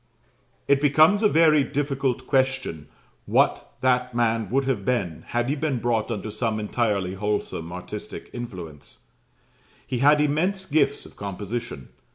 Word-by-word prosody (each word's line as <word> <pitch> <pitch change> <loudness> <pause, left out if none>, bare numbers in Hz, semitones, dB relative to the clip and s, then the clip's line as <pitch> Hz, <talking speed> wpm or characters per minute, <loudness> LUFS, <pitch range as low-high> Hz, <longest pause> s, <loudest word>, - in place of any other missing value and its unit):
It 140 0 +3
becomes 155 +8 +5
a 210 - +5
very 155 -4 +5
difficult 135 -3 -1
question 130 - 0 0.4
what - - +2
that 125 -1 +1
man 115 -3 +1
would 135 +2 +1
have 135 -2 -1
been, 100 -11 -2
had 120 0 -1
he 140 - 0
been 150 -3 -1
brought 115 -2 0
under 110 -2 -4
some 110 0 -1
entirely 105 -4 -1
wholesome 95 -4 -3
artistic 90 0 -7
influence, 90 -12 -8 0.8
He 125 -2 -3
had 145 +3 +5
immense 170 +7 +1
gifts 145 -4 +1
of - - -15
composition. 100 - -5
125 Hz, 140 wpm, -24 LUFS, 105-140 Hz, 0.8 s, becomes